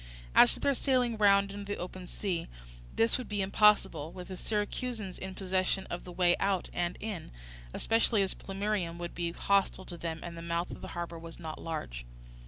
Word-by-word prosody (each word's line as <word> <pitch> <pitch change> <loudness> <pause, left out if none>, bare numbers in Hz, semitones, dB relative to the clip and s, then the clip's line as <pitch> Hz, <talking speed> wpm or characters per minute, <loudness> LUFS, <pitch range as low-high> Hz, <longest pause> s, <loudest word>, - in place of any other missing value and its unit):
As - - +7
to - - -8
their 280 - +3
sailing 250 -3 +2
round 200 -2 +5
into 205 0 -6
the - - -4
open 180 0 -6
sea, 180 -4 -2 0.5
this 230 +3 +3
would 255 - -6
be 205 -2 0
impossible, 190 -6 +4
with 180 +1 -9
the 190 - -4
Syracusans 210 0 -2
in 190 0 -6
possession 190 0 0
of 175 - -4
the 180 - -7
way 175 0 +4
out 195 -2 +1
and 175 0 -1
in, 210 -6 -5 0.4
especially 225 - +2
as 190 - -1
Plemmyrium 195 -3 -2
would 175 0 -5
be 170 -1 -1
hostile 195 +1 +1
to 175 - -8
them, 165 -1 -3
and 170 -1 -6
the 165 - -7
mouth 170 +1 -1
of - - -8
the - - -6
harbour 170 -1 -4
was 165 0 -9
not 160 -2 -6
large. 60 - -4
185 Hz, 195 wpm, -31 LUFS, 170-205 Hz, 0.5 s, As